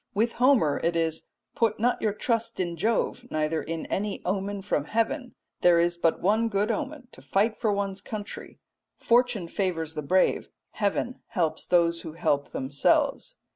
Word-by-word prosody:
With 225 +3 +2
Homer 245 - +3
it 170 +1 +1
is, 165 -1 -1 0.3
"Put 225 -2 +1
not 245 +3 +1
your 215 - +2
trust 230 +2 -2
in 175 -2 -1
Jove 225 +6 0
neither 155 +1 0
in 165 -1 -4
any 200 0 -2
omen 195 +1 -2
from 150 -7 0
heaven; 230 - -1 0.2
there 175 -1 +5
is 170 +1 +2
but 165 -1 +1
one 220 +4 +3
good 205 +2 +1
omen 280 0 -4
to - - -14
fight 200 - +1
for 220 -3 +1
one's 200 -1 -2
country. 210 -2 -7 0.4
Fortune 240 -6 +2
favours 165 -4 -2
the 155 - -3
brave; 185 +6 +2 0.2
heaven 215 +4 -1
helps 165 -7 -1
those 170 -1 +3
who 160 - -8
help 145 -4 0
themselves." 135 +2 +1
195 Hz, 165 wpm, -27 LUFS, 165-225 Hz, 0.4 s, there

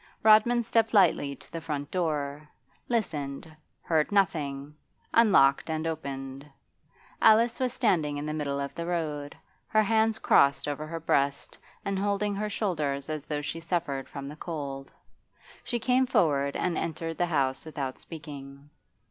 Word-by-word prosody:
Rodman 220 +3 +6
stepped 225 0 +1
lightly 160 -7 +4
to - - -17
the 165 - -5
front 145 -2 -4
door, 150 -4 -2 0.4
listened, 155 - -2 0.3
heard 160 0 +1
nothing, 150 -7 0 0.4
unlocked 160 -12 +5
and 160 0 -2
opened. 135 -4 -5 0.8
Alice 225 +2 +5
was 255 -1 0
standing 175 - +1
in 145 - -4
the 155 - -3
middle 140 -2 -2
of 140 0 -4
the 170 0 -5
road, 150 -4 -3 0.3
her 215 -1 +3
hands 220 +1 +2
crossed 140 -8 +3
over 150 +1 -3
her 165 +1 -5
breast 140 -3 0 0.3
and 195 -1 -1
holding 205 +1 0
her 210 +1 -2
shoulders 155 -9 -2
as 155 -2 -4
though 150 -1 -3
she 165 - -4
suffered 165 -5 -2
from 140 -1 -7
the 145 - -7
cold. 140 -4 -6 0.7
She 240 - -2
came 255 +2 +2
forward 140 - +2
and 175 -3 0
entered 165 0 -4
the 175 - +2
house 135 -5 0
without 140 -4 -5
speaking. 145 -3 -10
155 Hz, 150 wpm, -28 LUFS, 140-200 Hz, 0.8 s, Rodman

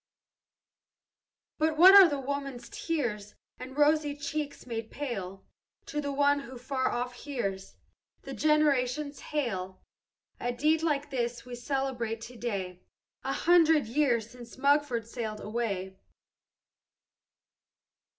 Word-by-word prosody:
"But 310 0 +1
what 370 +4 +9
are 350 -8 +8
woman's 275 -2 -5
tears, 220 -11 -3 0.2
And 260 +2 -9
rosy 295 -1 +3
cheeks 290 0 -4
made 225 -2 -5
pale, 195 -9 -5 0.4
To 295 - -3
one 285 +1 +3
who 260 -2 -9
far 260 +1 -1
off 245 +1 -2
hears 235 -8 -5 0.5
The - - -7
generations 295 -2 +1
hail 190 -11 -3 0.6
A 245 0 -2
deed 305 +6 +2
like 295 -3 -1
this 240 -2 -2
we 250 - -9
celebrate 245 -3 -2
to 245 +2 -9
day, 195 -6 -4 0.4
A 270 - -2
hundred 325 -4 +4
years 235 -2 +1
since 240 -1 -13
Mugford 280 -4 +2
sailed 220 -3 -5
away! 200 -4 -3
260 Hz, 110 wpm, -29 LUFS, 230-290 Hz, 0.6 s, what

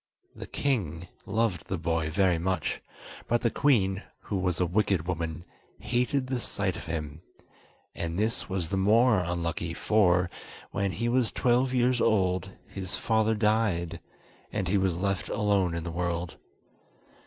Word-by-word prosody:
The - - -8
king 90 - -1 0.2
loved 105 -5 0
the 95 - -2
boy 80 -1 0
very 90 0 +2
much, 90 -2 -1 0.5
but 120 0 +2
the 115 - +1
queen, 100 -9 +2 0.2
who 100 - -3
was 90 -2 0
a 90 - +3
wicked 95 -2 +1
woman, 85 -1 -3 0.3
hated 125 +2 0
the 130 -1 -2
sight 100 -5 -1
of - - -7
him; 80 -2 -4 0.7
and 85 0 -4
this 110 +1 -1
was 95 -4 -2
the 95 - -1
more 110 +3 +5
unlucky 85 -1 -2
for, 90 -4 +3 0.4
when 100 -1 0
he 115 +7 -1
was 120 -1 +2
twelve 125 +1 +2
years 125 -1 +2
old, 95 -4 +2 0.2
his 95 -2 -5
father 110 0 +2
died, 105 -6 +1 0.5
and 100 -3 -2
he 100 - +3
was 95 -3 0
left 100 -2 -1
alone 100 -5 +1
in 85 - -3
the 85 - -4
world. 85 -1 -2
95 Hz, 155 wpm, -28 LUFS, 85-110 Hz, 0.7 s, more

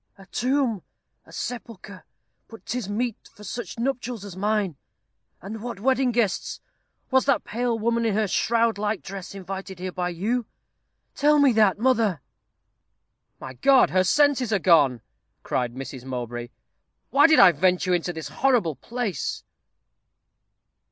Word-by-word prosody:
A 195 - -14
tomb 250 -1 0 0.5
a - - -16
sepulchre 220 -6 -7 0.4
but 225 - -14
'tis 235 -3 -4
meet 230 +2 -3
for 210 - -14
such 235 +4 -6
nuptials 245 -3 -3
as 195 -3 -9
mine 205 -3 0 0.7
and 210 +3 -7
what 235 -3 -6
wedding 260 +2 +2
guests! 225 -5 -1 0.5
Was 260 0 +3
that 275 -2 +2
pale 235 +1 -1
woman 230 +1 0
in 210 - 0
her 215 0 +1
shroud 230 +2 +1
like 210 -1 -2
dress 195 0 -8
invited 195 0 -7
here 185 +1 -5
by 180 0 -2
you? 215 +7 -2 0.7
Tell 295 +1 +3
me 285 -2 +5
that, 215 -4 +3
mother." 225 - +2 1.2
"My 130 - -8
God, 260 - +4
her 185 0 +3
senses 275 +1 +2
are 205 - +3
gone!" 150 - +4 0.4
cried 125 -1 -2
Mrs. 130 -1 -7
Mowbray. 120 -2 -5 0.6
"Why 285 +3 +6
did 315 - +5
I 195 -2 +8
venture 180 +3 +1
into 175 0 0
this 160 -3 -7
horrible 210 - +1
place?" 225 - -4
210 Hz, 145 wpm, -24 LUFS, 180-245 Hz, 1.2 s, I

